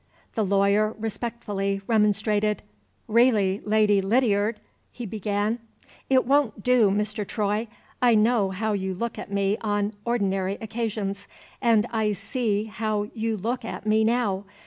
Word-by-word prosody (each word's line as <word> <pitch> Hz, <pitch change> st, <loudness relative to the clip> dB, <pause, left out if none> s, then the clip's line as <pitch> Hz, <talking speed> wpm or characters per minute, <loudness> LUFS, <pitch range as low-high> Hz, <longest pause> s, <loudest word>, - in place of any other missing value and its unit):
The 220 Hz, -, 0 dB
lawyer 200 Hz, +2 st, +2 dB
respectfully 215 Hz, -3 st, -3 dB
remonstrated. 210 Hz, -1 st, +1 dB, 0.4 s
"Really, 215 Hz, -4 st, +3 dB
Lady 210 Hz, -1 st, +3 dB
Lydiard! 210 Hz, 0 st, +1 dB, 0.2 s
" -, -, -42 dB
he 240 Hz, -, -7 dB
began. 210 Hz, +2 st, -1 dB, 0.5 s
"It 260 Hz, -1 st, +4 dB
won't 270 Hz, -6 st, +1 dB
do, 250 Hz, -4 st, +4 dB
Mr. 210 Hz, +1 st, -1 dB
Troy! 210 Hz, +2 st, -1 dB, 0.3 s
I 240 Hz, -2 st, +5 dB
know 215 Hz, -2 st, +3 dB
how 210 Hz, +3 st, -2 dB
you 190 Hz, -2 st, -2 dB
look 235 Hz, +5 st, -4 dB
at -, -, -8 dB
me 200 Hz, +1 st, 0 dB
on 205 Hz, -1 st, -1 dB
ordinary 195 Hz, -5 st, 0 dB
occasions, 215 Hz, -3 st, -4 dB, 0.3 s
and 230 Hz, -3 st, +4 dB
I 220 Hz, -2 st, +1 dB
see 215 Hz, -2 st, -1 dB
how 215 Hz, -1 st, -3 dB
you 225 Hz, -1 st, -2 dB
look 235 Hz, +5 st, -2 dB
at 225 Hz, -, -6 dB
me 215 Hz, +1 st, +3 dB
now. 220 Hz, -4 st, 0 dB
215 Hz, 140 wpm, -25 LUFS, 200-230 Hz, 0.5 s, I